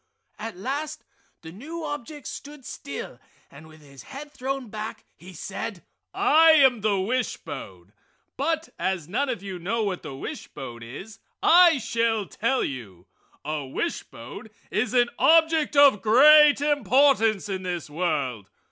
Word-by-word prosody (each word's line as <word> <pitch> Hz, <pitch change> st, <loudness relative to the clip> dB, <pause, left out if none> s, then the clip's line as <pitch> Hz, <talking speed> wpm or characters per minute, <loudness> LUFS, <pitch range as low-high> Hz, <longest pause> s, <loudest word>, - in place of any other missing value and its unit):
At 220 Hz, -3 st, -6 dB
last 280 Hz, +9 st, -4 dB, 0.4 s
the 160 Hz, -, -9 dB
new 310 Hz, -, -8 dB
object 290 Hz, -1 st, -6 dB
stood 290 Hz, -2 st, -9 dB
still 140 Hz, -3 st, -8 dB, 0.3 s
and 150 Hz, +3 st, -14 dB
with 155 Hz, 0 st, -17 dB
his 140 Hz, -3 st, -14 dB
head 290 Hz, -, -10 dB
thrown 270 Hz, -2 st, -4 dB
back 215 Hz, +1 st, -7 dB
he 185 Hz, +2 st, -13 dB
said: 190 Hz, +2 st, -6 dB, 0.3 s
"I 320 Hz, +1 st, +5 dB
am 265 Hz, -8 st, +4 dB
a 205 Hz, -3 st, +1 dB
wish 245 Hz, +6 st, -1 dB
bone, 100 Hz, -, -10 dB, 0.4 s
but 320 Hz, +3 st, -2 dB
as 185 Hz, -5 st, -2 dB
none 265 Hz, +10 st, -1 dB
of 235 Hz, -7 st, -4 dB
you 190 Hz, -2 st, -6 dB
know 220 Hz, +6 st, -1 dB
what 195 Hz, -3 st, -3 dB
a 145 Hz, -4 st, -7 dB
wishbone 130 Hz, -3 st, -8 dB
is, 190 Hz, -, -10 dB, 0.2 s
I 345 Hz, -2 st, +7 dB
shall 230 Hz, -3 st, 0 dB
tell 240 Hz, +7 st, -1 dB
you! 100 Hz, -10 st, -7 dB, 0.4 s
A 150 Hz, -1 st, -3 dB
wishbone 130 Hz, -, -6 dB, 0.2 s
is 220 Hz, +3 st, -1 dB
an 240 Hz, -1 st, +3 dB
object 320 Hz, -2 st, +4 dB
of 280 Hz, -7 st, +6 dB
great 290 Hz, +6 st, +7 dB
importance 275 Hz, -7 st, +3 dB
in 190 Hz, -2 st, -4 dB
this 175 Hz, -3 st, -4 dB
world. 145 Hz, -, -2 dB
220 Hz, 145 wpm, -25 LUFS, -, 0.4 s, I